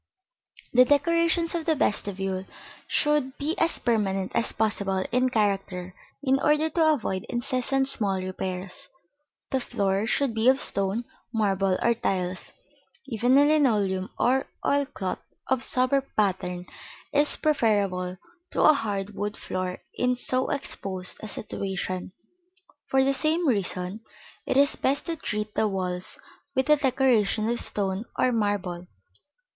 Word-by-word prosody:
The 250 +1 +8
decorations 335 +4 +2
of 335 -2 -2
the 320 - +2
vestibule 195 -6 -1 0.4
should 295 -3 +1
be 300 +3 -1
as 330 0 +2
permanent 195 -5 0
as 235 - +1
possible 200 -3 0
in 255 +1 +2
character, 195 -5 -1 0.3
in 270 -1 +3
order 300 +2 +2
to 315 -1 +4
avoid 190 -9 -2
incessant 255 +2 0
small 200 -7 0
repairs. 185 0 -4 0.6
The 265 - +2
floor 200 -3 -1
should 275 0 +1
be 225 +3 +3
of 265 +1 +4
stone, 200 -1 +1 0.3
marble, 195 -4 +1
or 235 - +4
tiles; 185 -5 -2 0.5
even 245 +1 +2
a 285 - +6
linoleum 215 -11 +2
or 265 +2 +2 0.2
oil 285 0 +2
cloth 190 -9 -4 0.3
of 260 -1 +1
sober 255 +2 +2 0.2
pattern 180 -3 0 0.5
is 290 +1 +3
preferable 200 -10 +1 0.4
to - - +2
a 310 - +8
hard 205 -7 -3
wood 205 +2 -3
floor 185 0 -4
in 250 0 +1
so 255 +1 -1
exposed 190 -9 -3
a 220 - -6
situation. 190 -3 -4 0.8
For 265 0 +3
the 275 +1 +2
same 315 +4 +1
reason, 195 -3 -1 0.5
it - - +1
is 280 0 +4
best 275 +2 0
to 335 - -2
treat 210 -7 -4
the 220 - +2
walls 185 -2 -3 0.4
with 265 +3 +2
a - - +9
decoration 250 -6 +2
of 240 - -1
stone 195 +1 -1
or 255 - +3
marble. 200 -6 -1
220 Hz, 140 wpm, -26 LUFS, 190-270 Hz, 0.8 s, a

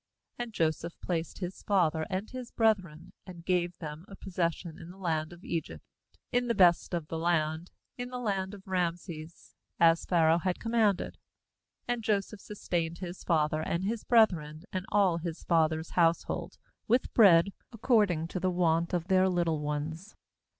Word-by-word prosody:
"And 240 -1 -4
Joseph 165 -2 -1
placed 165 -3 -3
his 185 -1 -6
father 165 -6 +1
and 190 +3 -2
his 255 -2 -7
brethren, 185 -8 0
and 170 -2 -10
gave 175 -2 0
them 150 0 -7
a 195 - -11
possession 170 -3 -3
in 165 - -10
the 185 - -12
land 160 -4 -1
of 175 0 -13
Egypt, 165 -2 -4 0.5
in 245 0 +1
the 235 - +1
best 180 -2 +4
of 165 -3 -4
the 160 - -4
land, 160 0 0 0.3
in 245 0 -4
the 250 - -5
land 200 -4 -2
of 190 - -15
Rameses, 170 -3 -4 0.3
as 165 0 +5
Pharaoh 165 -1 +3
had 185 +1 -1
com 225 - -4
manded. 215 -5 +1 0.7
^And 245 -1 -1
Joseph 210 -1 -1
sustained 170 -5 -3
his 180 0 -7
father, 155 -2 +1
and 170 +3 -2
his 220 +3 -2
brethren, 165 -10 +3
and 185 0 -3
all 195 -5 +3
his 165 -1 -5
father's 160 -1 +1
household, 170 -1 +1 0.3
with 245 +3 +1
bread, 195 -5 +7 0.2
ac 230 -3 -13
cording 200 -10 +3
to 185 - -3
the 185 - +1
want 170 -1 +1
of 170 0 -2
their 190 -1 +4
little 170 -3 +1
ones. 155 +6 -4
175 Hz, 170 wpm, -30 LUFS, 165-195 Hz, 0.7 s, bread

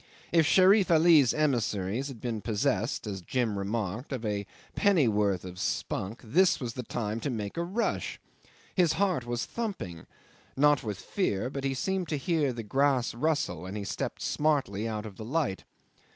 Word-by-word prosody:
If 165 -3 +4
Sherif 190 +3 +5
Ali's 160 -6 +6
emissaries 120 -5 0
had 135 -5 -8
been 115 -2 -3
possessed 105 +3 0
as 100 -3 -4
Jim 115 +2 -1
remarked 105 +4 -3
of 125 -4 -3
a 100 -2 -2 0.3
pennyworth 105 - +2
of 90 0 -8
spunk, 100 +3 -2
this 170 - +3
was 120 -3 -4
the 125 - -4
time 110 -2 -3
to 145 - -2
make 105 -5 -4
a 170 - -1
rush. 200 +7 -2 0.5
His 175 -4 +3
heart 180 -11 0
was 120 0 -2
thumping 190 - -5 0.5
not 145 0 +5
with 105 -4 -3
fear 125 - -1
but 140 -1 -4
he 135 -1 0
seemed 190 +5 -1
to 150 - 0
hear 150 -1 +1
the 115 -2 -5
grass 135 +2 +1
rustle, 145 - -1
and 100 +3 -5
he 105 - -4
stepped - - -4
smartly 135 -9 0
out 110 -1 -3
of 105 -3 -9
the 110 - -7
light. 130 -5 -1
125 Hz, 170 wpm, -29 LUFS, 105-155 Hz, 0.5 s, Ali's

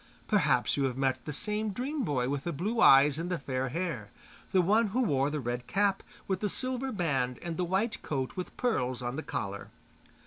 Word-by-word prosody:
Perhaps - - +2
you 140 - +2
have 130 -1 -2
met 130 -2 0
the - - -3
same 210 +7 -2
dream 265 +7 -2
boy 130 - 0
with 140 0 -2
the 170 - -2
blue 205 +10 -1
eyes 140 +2 +7
and 170 +2 -3
the 180 - 0
fair 130 -2 -2
hair, 150 - -3 0.4
the 190 - +4
one 210 +6 +4
who 245 +6 +1
wore 140 - +2
the 150 0 -2
red 120 -1 -3
cap 200 -1 +1 0.3
with 190 -2 0
the 210 - -1
silver 260 +4 -2
band 135 - 0
and 170 -1 -3
the 180 - -1
white 190 +6 0
coat 135 -3 -3
with 185 - -6
pearls 130 - 0
on 120 +1 -3
the 155 - -3
collar. 100 -8 -4
165 Hz, 210 wpm, -30 LUFS, 130-205 Hz, 0.4 s, eyes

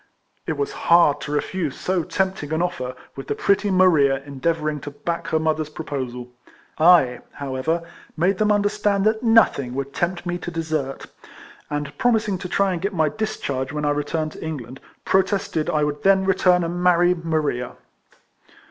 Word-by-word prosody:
It - - 0
was 420 -1 -1 0.2
hard 170 -4 +5
to 145 - -5
refuse 150 0 -2
so 185 -1 0
tempting 190 -3 -2
an 160 - 0
offer, 130 -8 -3 0.2
with 135 - -8
the - - -1
pretty 200 +1 +1
Maria 160 -8 +4
endeavouring 150 +2 -2
to 145 - -7
back 165 +4 -4
her 160 - +1
mother's 155 -1 0
proposal. 130 -5 -5 0.5
I, 155 -7 +5
however, 140 +5 -2 0.3
made 185 +4 +1
them 210 -1 +3
understand 205 -1 +1
that 220 0 +2
nothing 225 - +3
would 140 0 -4
tempt 175 +1 -2
me 175 0 -2
to - - -5
desert; 155 -5 -3 0.6
and, 145 -1 -4
promising 215 -6 +1
to 180 -1 -6
try 195 0 +1
and 170 - -4
get 195 0 -2
my 160 -2 +2
discharge 140 -10 -3
when 150 0 -3
I 145 - +2
returned 155 +2 -2
to - - -10
England, 135 -5 -6 0.3
protested 190 -4 +1
I 150 -1 +1
would 150 0 -2
then 195 0 +4
return 180 -2 +3
and 175 +1 -3
marry 175 0 +4
Maria. 155 -7 -2
165 Hz, 165 wpm, -22 LUFS, 145-185 Hz, 0.6 s, hard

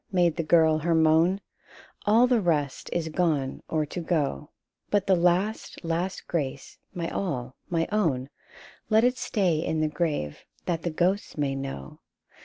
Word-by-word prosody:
" - - -42
made 170 -2 +3
the 170 - -1
girl 160 -1 +4
her 165 +2 +1
moan 160 +4 +4 0.2
— - - -22
" - - -27
All 225 +4 +6
the 245 -3 +3
rest 150 -6 0
is 165 -2 -1
gone 155 -5 0
or 155 -1 +1
to 150 - -6
go; 150 - -1 0.4
But 205 -2 +2
the 190 - +4
last, 180 +5 +1
last 175 +3 -2
grace, 140 -5 -3
my 170 -3 -3
all, 130 -9 -3
my 165 -1 0
own, 150 -11 +1 0.6
Let 220 0 +5
it 250 +1 +2
stay 180 -8 +1
in 160 -1 -1
the 155 - +2
grave, 150 - -2 0.2
that 165 -2 -1
the 170 - -1
ghosts 180 +5 0
may 140 -2 0
know! 135 - -6
165 Hz, 175 wpm, -27 LUFS, 150-180 Hz, 0.6 s, All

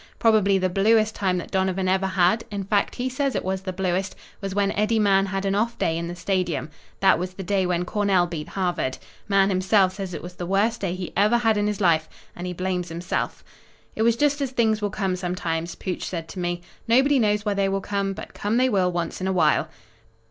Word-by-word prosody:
Probably 210 -4 +4
the 185 0 +1
bluest 215 +4 +3
time 185 -2 0
that 175 - -6
Donovan 190 -1 0
ever 190 +1 +2
had 190 +4 +2
in 200 -1 -4
fact, 200 +1 0
he 250 +1 -2
says 270 +1 -1
it - - -2
was 190 0 -1
the 190 -1 -4
bluest 185 +1 -1 0.3
was 195 -1 -4
when 200 -1 +2
Eddie 215 +2 +1
Mahan 195 -2 +3
had 195 +1 -3
an 195 - +1
off 230 +4 0
day 165 - 0
in 170 0 -3
the 175 - -5
Stadium. 175 -5 -1 0.3
That 195 - +5
was 180 +1 -4
the 195 - -6
day 190 -1 +1
when 180 0 0
Cornell 195 -2 +2
beat 165 -3 -5
Harvard. 175 -8 -2 0.3
Mahan 195 -1 +3
himself 190 0 +3
says 190 -3 -5
it - - -7
was 175 +1 -8
the 175 -1 -6
worst 210 +5 +1
day 185 -3 -1
he 185 -1 -6
ever 210 +5 +4
had 225 -2 +2
in 205 0 +1
his 210 -1 -2
life, 165 -5 +2 0.3
and 175 +1 -5
he - - -3
blames 180 -1 -2
himself. 170 +2 -3 0.5
"It - - -2
was 230 0 +4
just 290 +2 +1
as 275 - 0
things 225 -4 +1
will 205 - 0
come 195 -2 -1
sometimes," 175 -2 -3
Pooch 185 - -4
said 165 -3 -4
to 185 - -7
me. 175 0 -2 0.2
"Nobody 265 +4 +4
knows 210 -1 +1
why 205 - +1
they 200 -1 +1
will 195 0 0
come, 200 0 -2
but - - -9
come 210 +3 -1
they 255 +1 +3
will 185 -5 +2
once 170 0 -3
in 190 - -1
a - - +1
while." 155 -3 +2
195 Hz, 235 wpm, -24 LUFS, 180-210 Hz, 0.5 s, That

